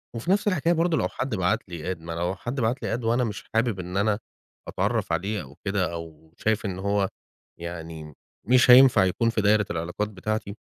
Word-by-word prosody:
وفي 150 +11 -2
نفس 205 +2 +2
الحكاية 170 -3 +2
برضو، 165 0 +1
لو - - +1
حد 130 -3 -3
بعت 90 -2 +1
لي 85 +2 -4
Add، - - -20
ما 85 +1 -8
لو 85 +3 -2
حد 125 +6 -5
بعت 120 +4 0
لي - - -1
Add 120 - -8
وأنا 120 +2 +2
مش 105 -3 -4
حابب 115 -3 +1
إن 90 +1 -4
أنا 105 +1 +1 0.5
أتعرّف - - -1
عليه، 100 +6 -1
أو 70 +1 -14
كده، 95 -4 0
أو 80 -1 -9
شايف 110 0 0
إن 95 -2 -3
هو 100 0 0 0.5
يعني 80 -2 -7 0.3
مش 125 +1 +6
هينفع 125 -6 +8
يكون 115 +5 +1
في 115 -1 0
دايرة 105 0 +3
العلاقات 90 +6 -3
بتاعتي، 105 +1 -4
100 Hz, 200 wpm, -25 LUFS, 85-115 Hz, 0.5 s, هينفع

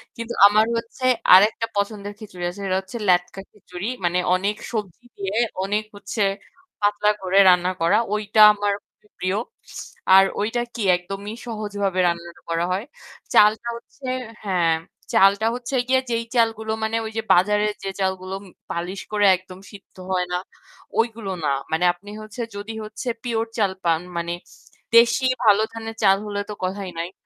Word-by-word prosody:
কিন্তু 230 0 -5
আমার 215 +2 +4
হচ্ছে 230 +3 -5 0.3
আরেকটা 210 +4 +6
পছন্দের 205 0 -2
খিচুড়ি 185 -5 -9
আছে। 180 +3 -10
সেটা 185 -1 +1
হচ্ছে 190 +5 -8
লেটকা 180 +2 +2
খিচুড়ি। 190 -1 -7 0.2
মানে 175 +1 +1 0.2
অনেক 200 +3 -1 0.2
সবজি 210 0 -5
দিয়ে 195 +1 -3 0.3
অনেক 205 +2 0
হচ্ছে 205 +2 -4 0.6
পাতলা 205 0 +3
করে 190 +1 0
রান্না 180 0 +4
করা। 170 +5 +4 0.2
ওইটা 215 0 -1
আমার 205 0 -1
খুবই 210 - -32
প্রিয়। 185 +2 0 0.8
আর 195 - +9 0.2
ওইটা 225 +3 -1
কি 235 - -4 0.2
একদমই 195 +4 -7
সহজভাবে 205 -4 -2
রান্না 170 0 -2 0.2
করা 165 +1 0
হয়। 200 +5 -3 0.5
চালটা 215 +3 +5
হচ্ছে 265 +3 -15 0.4
হ্যাঁ, 175 -4 +2 0.4
চালটা 200 +3 +5
হচ্ছে 250 +2 -4
গিয়ে 260 0 +3
যেই 230 0 -1
চালগুলো 225 -2 +1
মানে 220 +1 -1
ওই 220 - -5
যে 225 - +1
বাজারের 210 +3 +3
যে 195 - -2
চালগুলো 190 0 -2 0.4
পালিশ 180 +3 -4
করে 205 -1 +2
একদম 185 0 -13
সিদ্ধ 200 -1 -15 0.2
হয় 180 -1 +1
না, 180 - +2 0.6
ওইগুলো 225 -4 -1
না। 145 - +1 0.2
মানে 160 +3 +1
আপনি 200 +4 -15
হচ্ছে 215 +3 -8
যদি 205 +2 -6
হচ্ছে 215 +4 -8 0.2
pure 230 -2 -1
চাল 200 -3 +2
পান 165 -1 +2 0.2
মানে 170 0 -2 0.6
দেশি 235 +3 +5 0.2
ভালো 210 -1 +5
ধানের 225 0 -6
চাল 195 -1 +6
হলে 205 -1 -3
তো - - -3
কথাই 190 0 -3
নাই। 170 +2 -4
205 Hz, 160 wpm, -22 LUFS, 185-220 Hz, 0.8 s, আর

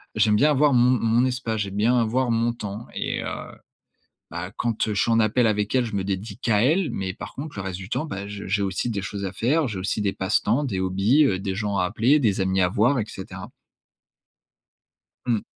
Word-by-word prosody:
j'aime 105 - +3
bien 145 +8 +4
avoir 145 0 +3
mon 125 0 +5
mon 115 +2 +2
espace. 125 -4 -2
J'aime 100 -1 -4
bien 110 +5 +3
avoir 120 +2 +1
mon 115 +1 +1
temps 105 0 -7
et, - - -2
heu, - - -4 1.0
ben, - - -5
quand, 115 -1 -1
heu, 105 - -1
je 100 - +1
suis - - +1
en 115 - +4
appel 115 +2 +3
avec 105 -1 0
elle, 130 -2 +2
je 110 -3 -5
me 100 - -1
dédie 100 +2 -4
qu'à 105 -3 +1
elle, 160 +6 +2
mais 95 -1 -3
par - - -8
contre 145 -3 -7
le 100 - -3
reste 95 -1 -4
du 95 0 -9
temps, 155 - -1
bah, 100 -9 -6
je 100 -1 -7
j'ai 100 +2 0
aussi 95 +5 -2
des 100 -3 -2
choses 100 0 -5
à 95 - -3
faire, 145 +6 +1
j'ai 105 -5 -4
aussi 100 +3 -2
des 100 -1 0
passe-temps, 110 +8 +1
des 100 -8 -2
hobbies, 95 +10 +3
heu, 95 -9 +1
des 95 -1 -3
gens 105 -1 -2
à 90 - +2
appeler, 115 +10 +3
des 105 -8 +1
amis 95 0 +1
à 90 - +4
voir 120 +8 +2
et 110 - -1
cetera. 95 -2 -8 1.8
Mmh. 115 -4 +1
110 Hz, 230 wpm, -24 LUFS, 100-120 Hz, 1.8 s, mon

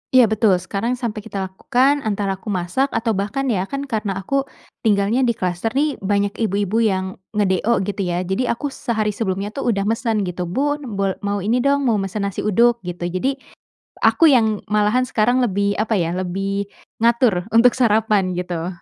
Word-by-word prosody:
Iya 255 - +8
betul, 215 -3 +3
sekarang 195 +7 -2
sampai 235 -4 -4
kita 195 -3 -5
lakukan. 265 +8 +2
Antara 200 -5 -2
aku - - -16
masak 190 +7 0
atau 225 0 +1
bahkan, 205 +7 -2
ya 195 -2 -1
kan 275 0 -4
karena 215 -7 -2
aku 275 +6 -1 0.3
tinggalnya 210 +2 +2
di 235 - +1
kluster 180 +1 -2
nih 290 +1 0
banyak 200 +1 0 0.2
ibu-ibu 205 +2 0
yang 190 -4 0 0.2
nge-DO, 200 +1 +1
gitu 200 0 -3
ya. 175 +1 -1
Jadi, 190 +7 -1
aku 275 +4 -2
sehari 220 -5 -1
sebelumnya 200 -1 -3
tuh 275 +2 -4
udah 200 -4 +1
mesen 225 0 0
gitu, 180 -1 -4
"Bun, 275 - -2
bol 195 -1 +1
mau 200 -1 -2
ini 235 +4 +1
dong, 280 +2 +2
mau 225 -5 +2
mesen 195 +1 -3
nasi 200 -1 -3
uduk." 235 +3 +3
Gitu. 175 0 -5 0.2
Jadi, 270 +7 0 0.7
aku 330 - +5
yang 220 -6 +3
malahan 215 +5 +2
sekarang 245 +3 +2
lebih, 200 -3 +1
apa 220 0 +1
ya, 170 -2 0
lebih 195 +2 -2 0.3
ngatur 230 -5 +2
untuk 230 +2 +5
sarapan, 215 -6 +2
gitu. 175 -1 -3
210 Hz, 180 wpm, -20 LUFS, 195-235 Hz, 0.7 s, Iya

